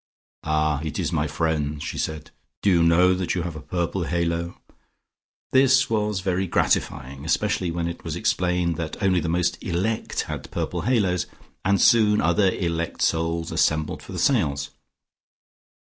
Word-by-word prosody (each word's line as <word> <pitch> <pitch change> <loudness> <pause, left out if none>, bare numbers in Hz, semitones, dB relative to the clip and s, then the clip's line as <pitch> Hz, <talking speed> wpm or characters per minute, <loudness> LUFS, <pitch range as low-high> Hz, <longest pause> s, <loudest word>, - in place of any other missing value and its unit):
"Ah, 75 -1 +1
it 80 - -4
is - - -1
my 75 - 0
friend," 75 -1 -1
she - - -5
said. 80 -1 -4 0.3
"Do 100 - +4
you 85 -2 +4
know 85 +2 +5
that 90 -1 -1
you 90 - -1
have 85 -2 -5
a 75 - -7
purple 85 +3 -2
halo?" 85 +2 -2 0.9
This 130 -1 +4
was 105 -3 0
very 95 0 0
gratifying, 65 -4 0
especially 85 +3 0
when 85 0 -2
it 85 - -6
was 80 -2 -4
explained 90 -1 0
that 80 -1 -4
only 95 -2 +3
the 85 - -2
most 90 +1 0
elect 95 +6 -1
had - - -6
purple - - -3
halos, 95 -7 +1 0.4
and 100 0 +2
soon 105 -2 +5
other 85 +4 +3
elect 85 -3 -2
souls 80 0 0
assembled 80 0 0
for - - -11
the - - -5
seance. 70 0 +1
85 Hz, 160 wpm, -24 LUFS, 80-95 Hz, 0.9 s, know